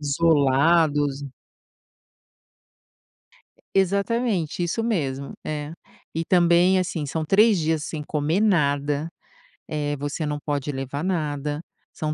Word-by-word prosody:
isolados. 145 -1 +2 2.5
E 195 - +4
Exatamente. 200 -3 -1
Isso 200 +7 -1
mesmo, 140 - -2
é. 150 +1 -4 0.4
E 165 +1 -2
também, 175 +1 +4
assim, 170 -4 -2
são 155 +3 -3
3 210 +4 +5
dias 160 -1 0
sem 150 -2 -5
comer 155 +6 0
nada. 145 -5 +1 0.6
Eh, 145 -1 -2
você 145 +3 -3
não 150 0 -2
pode 145 -1 -2
levar 135 +3 -4
nada. 150 -4 -2 0.3
São 155 -1 -2
155 Hz, 110 wpm, -24 LUFS, 145-175 Hz, 2.5 s, 3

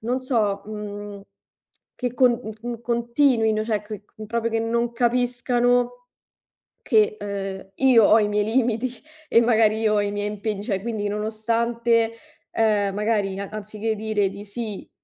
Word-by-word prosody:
non 245 +4 -1
so, 215 -6 0
mhmm, 205 -1 -7 0.7
che 245 -1 -3
con 250 0 +5
n 220 -2 -5 0.2
n 235 -1 -6
continuino, 235 -2 +2
cioè 215 -2 -1
que 210 -1 -8
che 215 0 -11
proprio 230 +1 -1
che 225 - 0
non 235 +1 0
capiscano 245 0 +1 0.9
che 430 0 +3
ehm, 195 -1 -5
io 245 -4 +5
ho 220 - +6
i 210 - +2
miei 210 0 +1
limiti 235 +1 0 0.4
e 230 - +6
magari 220 -2 +3
io 215 -1 +2
ho 205 - +3
i 205 0 -1
miei 205 0 -2
impegni, 210 -1 -3
cioè 195 -4 -2
quindi 215 -2 -3
nonostante, 230 +2 0 0.4
ehm, 205 -3 +1
magari 205 -2 0
a 200 - -5
anziché 215 +1 -5
che 220 - +1
dire 210 -2 0
di 200 +1 -9
sì 210 0 -6
220 Hz, 160 wpm, -23 LUFS, 205-235 Hz, 0.9 s, ho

